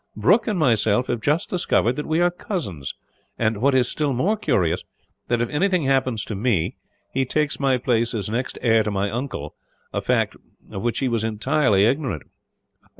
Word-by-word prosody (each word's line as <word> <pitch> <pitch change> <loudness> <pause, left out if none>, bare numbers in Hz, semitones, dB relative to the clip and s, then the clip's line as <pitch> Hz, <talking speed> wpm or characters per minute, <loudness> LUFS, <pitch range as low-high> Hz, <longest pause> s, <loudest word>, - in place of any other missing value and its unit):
Brooke 180 - +3
and 210 -4 0
myself 120 -5 +2
have 120 -2 -1
just 150 +7 +1
discovered 125 - +1
that 150 - -4
we 160 +1 +1
are 175 0 +4
cousins 105 - -5 0.4
and, 110 -1 +1
what 135 +5 +2
is 125 -2 +3
still 145 0 -1
more 175 - +1
curious, 95 - 0 0.4
that 120 -1 +1
if 120 - 0
anything 180 +2 +1
happens 130 -5 +1
to - - -5
me, 100 -5 0 0.4
he 135 - +2
takes 150 +3 0
my 135 -2 +2
place 120 -1 0
as 100 -4 -2
next 120 +4 -3
heir 115 -2 +4
to 105 - -1
my 100 0 -1
uncle, 120 - -4 0.4
a - - -1
fact - - +1 0.4
of 95 - -5
which 120 0 -1
he 135 - 0
was 115 -3 0
entirely 110 -1 +2
ignorant." 125 - 0
125 Hz, 185 wpm, -23 LUFS, 110-145 Hz, 0.4 s, are